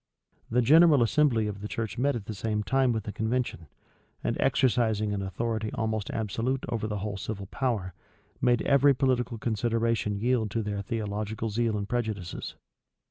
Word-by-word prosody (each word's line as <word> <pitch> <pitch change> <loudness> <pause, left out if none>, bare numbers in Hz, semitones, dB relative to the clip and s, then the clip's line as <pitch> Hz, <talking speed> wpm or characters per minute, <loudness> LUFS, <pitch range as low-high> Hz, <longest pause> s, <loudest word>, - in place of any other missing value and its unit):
The 125 +2 +2
general 155 0 +6
assembly 115 -2 +3
of 100 -1 -4
the 105 - -4
church 110 -1 -4
met 140 +1 +2
at 110 -4 -5
the 110 - -5
same 105 +1 -2
time 130 +2 +2
with 110 -3 -1
the 105 - -5
convention; 110 -7 -2 0.6
and - - 0
exercising 110 -4 +2
an 100 - -2
authority 110 +3 -2
almost 110 -3 -2
absolute 115 +4 -2
over 115 -2 -2
the 105 -1 -3
whole 100 -2 -3
civil 100 0 -5
power, 105 -5 -2 0.5
made 120 -2 +3
every 140 0 +5
political 125 -3 0
consideration 115 -1 0
yield 120 -1 +1
to 110 +3 -2
their 105 -1 -3
theological 110 0 -3
zeal 115 0 0
and 100 -1 -3
prejudices. 110 -7 -3
110 Hz, 165 wpm, -28 LUFS, 105-120 Hz, 0.6 s, general